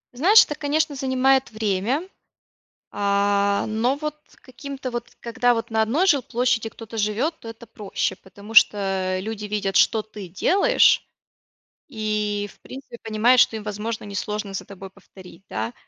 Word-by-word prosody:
Знаешь, 380 - +6
это, - - -4
конечно, 295 +1 -1
занимает 265 0 +2
время, 215 - -1 0.8
а, 200 0 +1
но 230 +5 0
вот 300 0 -5 0.2
каким-то 270 0 -8
вот 240 -1 -5
когда 245 +1 +1
вот 230 -1 -3
на 220 0 +2
одной 280 +12 +1
жилплощади 245 - +1
кто-то 225 0 -10
живет, 220 +9 0
то 230 - -10
это 225 +1 -13
проще. 210 -3 -3
Потому 200 +3 -13
что 195 -3 +3
люди 215 +1 -6
видят, 205 -2 -2
что 220 - +4
ты 210 -3 -10
делаешь, 390 - +3 0.8
и, 210 -4 -2
в - - -32
принципе, 260 -2 -11
понимают, 230 +3 +3
что 225 - +3
им, 215 - -7
возможно, 215 +2 -4
несложно 205 0 -4
за - - -4
тобой 195 -1 -11
повторить, 185 -2 -16
да. 110 +2 -3
220 Hz, 145 wpm, -23 LUFS, 205-255 Hz, 0.8 s, Знаешь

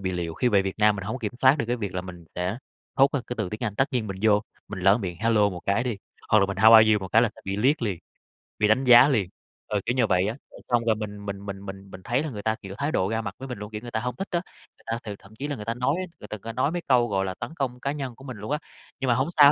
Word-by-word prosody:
bị 95 -1 -2
liệu. 85 -2 -3
Khi 125 - +1
về 100 -3 +4
Việt 95 +2 -4
Nam 105 -1 +4
mình 95 - -5
hông 110 - -3
kiểm 105 -1 -3
soát 135 +3 +5
được 115 - -1
cái 120 - 0
việc 100 -5 -5
là 90 - -1
mình 90 -2 -10
sẽ 90 +5 -2 0.4
thốt 135 +1 +5
ra 140 - 0
cái 125 - -4
từ 90 - -1
tiếng 105 - -6
Anh. 105 - -2
Tất 140 +3 +1
nhiên 120 -4 0
mình 95 -2 -5
vô, 105 -2 +5 0.3
mình 105 - -6
lỡ 95 +5 +5
miệng 90 -5 -4
"hello" 110 -3 +3
một 90 -2 -6
cái 100 +5 +2
đi, 120 -4 -2 0.3
hoặc 110 - +5
là 100 - +3
mình 100 -1 -4
"how 110 +3 +7
are 110 -1 +8
you?" 105 - +2
một 95 - -6
cái 115 +5 +5
là 120 - +3
sẽ - - -16
bị 95 0 -2
liếc 130 +6 +2
liền, 100 -7 -1 0.6
bị 105 - +4
đánh 110 +5 +3
giá 125 +2 +8
liền, 105 -9 +1 0.4
ờ, 105 - 0
kiểu 120 - 0
như 125 - +3
là 110 - +2
vậy 95 +1 +2
á. 110 - -2 0.2
Rồi - - -13
xong 120 -1 +2
rồi 110 -2 +3
mình 105 -1 -6
mình 100 0 -6
mình 100 -1 -5
mình 95 0 -9
mình 95 - -10
thấy 125 +8 0
là 155 - -3
người 105 -6 -6
ta, 110 0 +1
kiểu, 95 -1 -8
thái 145 +2 -1
độ 95 +2 +1
ra 110 0 -1
mặt - - -6
với 135 - -8
mình 125 -4 -5
luôn, 105 +1 -7
kiểu, 105 -1 -5
người 120 0 -8
ta 110 - -1
hông 125 +2 -3
thích 195 - -4
á. 175 -1 +1 0.4
Người - - -25
ta 115 +1 -2
thì 105 -2 -5
thậm 100 +2 -17
chí 140 +6 -4
là 145 - -3
người 105 - -8
ta 115 - -1
nói 125 +4 0
á, 185 - -2
người 105 - -10
ta 110 - -5
có 115 +3 -7
nói 130 +5 +1
mấy 175 0 -2
câu, 125 -3 +4
gọi 95 -3 0
là, 95 - -3
tấn 120 +6 -6
công 130 -5 -3
cá 140 - -2
nhân 135 -4 -5
của 130 - -15
mình 130 -4 -7
luôn 105 +6 -6
á. 150 - +2 0.4
Nhưng 135 - -2
mà 120 - +4
hổng 130 +4 +1
sao 145 -1 +9
110 Hz, 345 wpm, -25 LUFS, 100-125 Hz, 0.6 s, sao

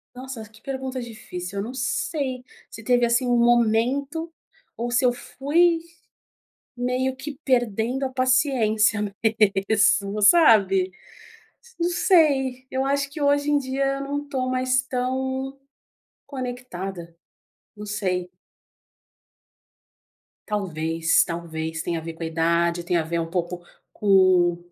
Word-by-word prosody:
Nossa, 255 -2 -7
que 220 0 -20
pergunta 265 -1 -4
difícil. 200 -5 -7
Eu - - -3
não 245 +4 -7
sei, 260 0 -2 0.2
se 225 - -11
teve 245 +1 +3
assim 235 +2 +1
um 245 -1 +2
momento 240 +7 +1 0.4
ou 240 +1 -3
se 245 +2 +2
eu 245 - +4
fui 330 +7 +1 1.0
meio 255 +1 -1
que 285 +1 -7
perdendo 245 0 0
a - - 0
paciência 250 -5 +2 0.7
mesmo, 200 -1 +2
sabe? 200 - +5 0.9
Não 340 +1 +1
sei. 285 -8 +2
Eu 265 0 -1
acho 280 0 0
que 295 +2 -8
hoje 285 +1 +2
em 295 - +4
dia 270 0 -1
eu - - -5
não 285 +1 -4
tô 260 -3 -2
mais 255 0 +1
tão 260 +1 -3 0.7
conectada. 195 - -6 0.6
Não 210 0 -8
sei. 185 -4 -2 2.2
Talvez, 165 -5 +1
talvez 160 -1 -4
tenha 170 -1 -2
a - - -13
ver 165 0 -7
com 165 - -11
a - - -1
idade, 170 +1 +1
tenha 175 -1 +1
a - - -1
ver 170 +1 -2
um 165 - -2
pouco 175 +1 -3 0.3
com 185 -4 +4
245 Hz, 130 wpm, -24 LUFS, 190-265 Hz, 2.2 s, sabe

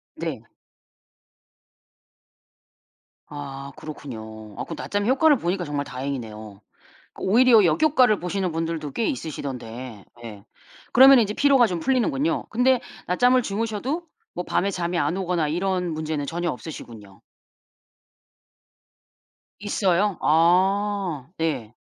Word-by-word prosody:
네. - - -5 2.8
아 140 -1 -8
그렇군요. 110 -8 -9
아 - - -4
그 - - -6
낮잠이 205 +2 -2
효과를 290 +3 +4
보니까 180 -2 -2
정말 145 -3 -3
다행이네요. 110 -7 -6 0.5
그 - - -12
오히려 230 +1 +5
역효과를 250 - +3
보시는 180 0 -2
분들도 165 -2 -3
꽤 230 - -1
있으시던데 125 - -6 0.2
예. 105 -3 -9 0.5
그러면 265 +1 +8
인제 210 -2 0
피로가 275 -3 +4
좀 180 -5 -3
풀리는군요. 270 - 0
근데 250 +2 +3 0.3
낮잠을 250 +8 +3
주무셔도 230 - -3 0.3
뭐 180 - -4
밤에 195 +3 0
잠이 175 -2 -2
안 150 +4 0
오거나 180 -5 -1
이런 180 +2 -1
문제는 155 -2 -3
전혀 175 +3 -2
없으시군요. 110 -6 -10 2.4
있어요? 200 -1 +1
아. 180 -1 +2
예. 125 -9 -2
175 Hz, 260 characters per minute, -24 LUFS, 140-215 Hz, 2.8 s, 그러면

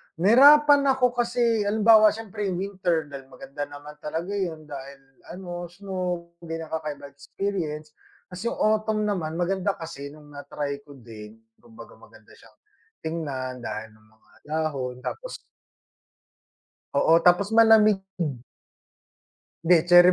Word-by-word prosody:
nahirapan 280 - +6
ako 250 -2 +2
kasi 235 -3 0
halimbawa 215 +1 +6
siyempre 210 -1 -3
yung 185 - -2
winter 185 -4 -1
dahil 135 -1 -9
maganda 140 +2 -8
naman 145 +1 -11
talaga 165 +5 -4
yun 175 -6 -3
dahil 140 -1 -9 0.3
ano 175 -1 -7
snow 180 -2 -5
pinakakakaibang 160 -3 -6
experience, 155 -1 -5 0.4
ta's 180 - -8
yung - - -2
autumn 215 0 +1
naman 170 -6 -2
maganda 190 +3 -1
kasi 160 -4 -8
nung 145 0 -14
na-try 145 0 -5
ko 140 - -13
din, 110 -3 -12 0.2
kumbaga 230 -2 -15
maganda - - -19
siyang - - -20 0.5
tingnan 135 -6 -4
dahil 110 -1 -6
yung 110 0 -24
mga 110 - -31 0.2
dahon 145 -5 -2
tapos - - -6 1.6
Oo, 165 +1 +5
tapos 180 +4 +4
malamig 220 -2 +6 0.2
Hmm. 140 -7 -2 1.3
Hindi 175 +1 +6
cherry 175 +1 +8
170 Hz, 125 wpm, -25 LUFS, 145-205 Hz, 1.6 s, cherry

